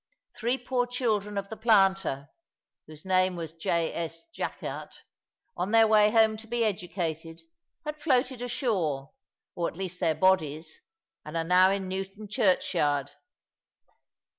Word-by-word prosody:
Three 240 +3 0
poor 245 -1 -1
children 215 -5 -1
of 200 0 -3
the 220 - -5
planter 195 - +2 0.6
(whose 155 +1 -12
name 185 -1 +2
was 165 -2 -6
J. 165 0 -1
S. 165 0 -5
Jackert), - - -5 0.6
on 180 +2 -2
their 225 +1 +6
way 215 -1 +5
home 220 -1 +4
to 220 +1 -12
be 235 0 0
educated, 170 -4 -3 0.5
had 300 0 -5
floated 255 -4 +1
ashore, 190 - -1 0.4
or 170 - -1
at - - -8
least 185 -1 -5
their 165 -3 +1
bodies, 160 -4 +1 0.4
and 155 +2 -5
are 165 - 0
now 180 +2 +5
in 195 -1 -1
Newton 195 +3 -5
churchyard. 175 - +1
190 Hz, 140 wpm, -28 LUFS, 165-220 Hz, 0.6 s, their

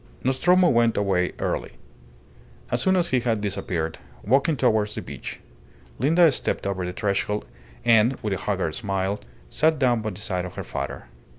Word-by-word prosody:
Nostromo 175 +8 +4
went 115 -5 +3
away 95 -3 +1
early. - - -2 1.0
As 125 - +1
soon 190 +7 +3
as 175 -2 +1
he 130 - +3
had 115 -3 0
disappeared, 90 -5 -3 0.2
walking 140 +7 +3
towards 110 -4 +2
the - - -3
beach, - - -7 0.6
Linda 160 +6 +5
stepped - - -2
over 95 -2 -2
the 90 - -3
threshold 105 +2 -1 0.4
and, 115 +2 +5
with 105 -2 0
a 95 - -3
haggard 95 -6 -1
smile, 100 -1 -2 0.3
sat 160 0 +3
down 125 -4 +2
by 110 - -2
the 95 - -8
side 95 -4 -2
of 90 - -8
her - - -4
father. - - -5
110 Hz, 170 wpm, -24 LUFS, 100-130 Hz, 1.0 s, Linda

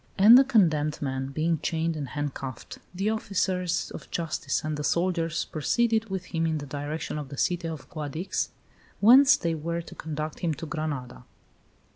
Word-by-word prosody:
And 210 +5 +9
the 265 - +9
condemned 160 - +2
man, 135 -1 -2
being 155 +3 0
chained 165 +1 -1
and 145 -3 -4
handcuffed, 135 -3 -5
the 195 +4 -1
officers 180 -5 -1
of - - -9
justice 165 -2 -2
and 155 0 -2
the 150 - -4
soldiers 170 0 0
proceeded 225 +8 0
with 190 -1 -4
him 165 0 +1
in 160 -1 0
the 145 - -6
direction 150 +2 -4
of 145 -3 -7
the 140 - -8
city 175 +2 0
of 160 -4 -7
Guadix, 155 +4 -3 0.5
whence 265 +7 +7
they 165 -1 -1
were 170 +2 -3
to - - -11
conduct 155 0 -5
him 165 -4 -1
to 165 - -7
Granada. 145 - -4
160 Hz, 170 wpm, -27 LUFS, 150-180 Hz, 0.5 s, And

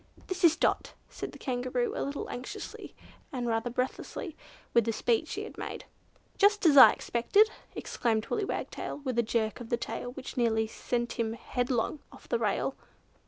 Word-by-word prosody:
"This 370 0 -4
is 330 -2 +7
Dot," - - 0
said - - -6
the - - -11
Kangaroo 250 -1 -1
a - - -2
little 280 +1 -3
anxiously, 250 +1 -7 0.4
and 250 -4 -3
rather 230 +1 0
breathless 250 +2 -3 0.6
with 235 - +5
the 230 - +1
speed 235 +6 +1
she 415 - -4
had 440 - -9
made. - - -5 0.5
"Just 410 -1 +4
as 305 -3 +7
I 265 - +12
had - - +1
expected!" 405 - +3 0.2
exclaimed 220 -2 0
Willy 425 -3 -1
Wagtail, - - -4
with 255 -4 0
a - - +7
jerk 220 -1 -1
of 235 -2 -8
the 240 - +1
tail 245 - -4
which 265 0 -8
nearly 220 -2 +2
sent 240 +2 -3
him 225 -1 0
headlong 245 +4 -1
off - - -15
the 235 - 0
rail. 230 +4 0
245 Hz, 180 wpm, -30 LUFS, 230-280 Hz, 0.6 s, I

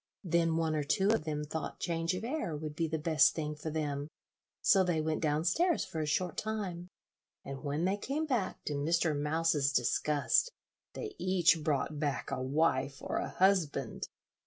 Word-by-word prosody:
Then 165 -2 +2
one 160 -1 +1
or 150 -1 0
two 190 +7 +2
of 220 -7 +2
them 150 -1 -2
thought 155 +2 -5
change 165 0 -1
of 185 - -5
air 235 - -2
would 150 0 -6
be 165 0 0
the 160 0 -2
best 150 -3 +4
thing 150 -2 -2
for 150 +2 -5
them, 145 -2 -2 0.5
so 195 -3 +5
they 175 -3 +1
went 155 0 -1
down 155 0 +1
stairs 340 - +2
for 160 - -4
a 155 - -2
short 155 +3 -1
time, 195 -5 -3 0.6
and 135 +1 -7
when 150 +3 -1
they 195 +2 +1
came 280 +9 -2
back, 245 -10 -1
to 150 - -2
Mr. 155 +2 +1
Mouse's 150 -1 +1
disgust, 140 - +2 0.4
they 425 -2 -5
each 180 -3 +3
brought 150 0 -1
back 145 -2 -2
a 130 - -2
wife 135 -1 +1
or - - -3
a - - -2
husband. 165 - +1
160 Hz, 185 wpm, -32 LUFS, 150-180 Hz, 0.6 s, so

